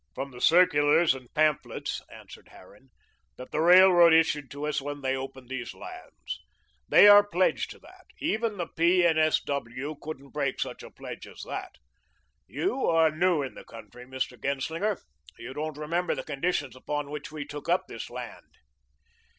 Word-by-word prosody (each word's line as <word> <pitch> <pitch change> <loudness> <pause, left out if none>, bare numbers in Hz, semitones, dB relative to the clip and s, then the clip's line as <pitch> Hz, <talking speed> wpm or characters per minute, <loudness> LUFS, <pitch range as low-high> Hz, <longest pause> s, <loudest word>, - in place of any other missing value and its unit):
"From 135 +1 -5
the 125 -1 -11
circulars 160 -2 +4
and 130 -2 -11
pamphlets," 155 -2 0
answered - - -14
Harran, 105 +8 -18 0.5
"that 125 - -10
the 155 - 0
railroad 175 -1 +7
issued 150 -3 +2
to 145 +1 -6
us 150 -1 -1
when 145 +1 -6
they 135 0 0
opened 130 -1 -7
these 130 -2 -6
lands. 365 0 -9 0.5
They - - +8
are 205 0 +9
pledged 185 -2 0
to - - -11
that. - - -18
Even 225 -7 -1
the 175 - -2
P. 175 +2 +2
and 160 -2 +3
S. 155 0 +3
W. 140 +1 -4
couldn't 140 -3 -8
break 140 -2 -2
such - - -4
a - - -10
pledge - - -9
as - - -11
that. - - -6 0.7
You 355 -8 -1
are 165 -1 +4
new 165 -1 +1
in 135 - -6
the - - -11
country, 125 +2 -13
Mr. 130 -2 -4
Genslinger. 160 +9 -1 0.4
You 125 +3 -8
don't 155 0 -4
remember 170 +4 -1
the - - -5
conditions 145 -3 -2
upon 145 +2 -4
which 150 0 -7
we 150 -2 -6
took 145 0 -8
up - - +2
this - - -8
land." - - -9
150 Hz, 175 wpm, -27 LUFS, 135-170 Hz, 0.7 s, are